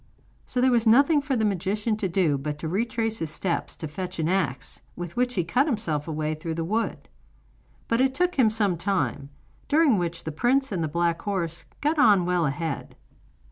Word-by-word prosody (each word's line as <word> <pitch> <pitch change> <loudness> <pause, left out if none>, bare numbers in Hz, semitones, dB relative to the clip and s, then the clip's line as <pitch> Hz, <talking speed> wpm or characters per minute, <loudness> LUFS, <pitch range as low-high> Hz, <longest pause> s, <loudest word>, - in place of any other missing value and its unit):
So 250 - -2
there 260 0 +4
was 235 -2 +2
nothing 280 +6 +5
for 280 -2 -1
the 220 -2 +1
magician 205 +3 0
to 195 -3 -2
do 170 -4 +2
but 150 +1 -4
to 160 - -5
retrace 225 +4 -1
his 160 - -2
steps, 170 +3 -2
to 160 - -5
fetch 180 +4 -5
an 160 -1 0
axe, 150 -7 -1
with 175 -1 -6
which 250 0 0
he 180 - +1
cut 250 - +1
himself 170 - -1
a - - -3
way 155 0 -1
through 160 +1 -5
the 165 - -2
wood. 215 +7 -2 0.8
But 230 +2 +2
it 265 0 +2
took 360 +4 +1
him 250 -5 +4
some 205 -5 +1
time, 170 -6 -1 0.4
during 295 - +4
which 170 -1 -3
the 160 - -4
prince 260 - +1
and 175 -4 -1
the - - 0
black 170 +2 0
horse 175 -5 -2 0.2
got 300 +2 +1
on 205 -8 +5
well 175 -3 +1
ahead. 145 +1 -4
190 Hz, 205 wpm, -25 LUFS, 165-235 Hz, 0.8 s, nothing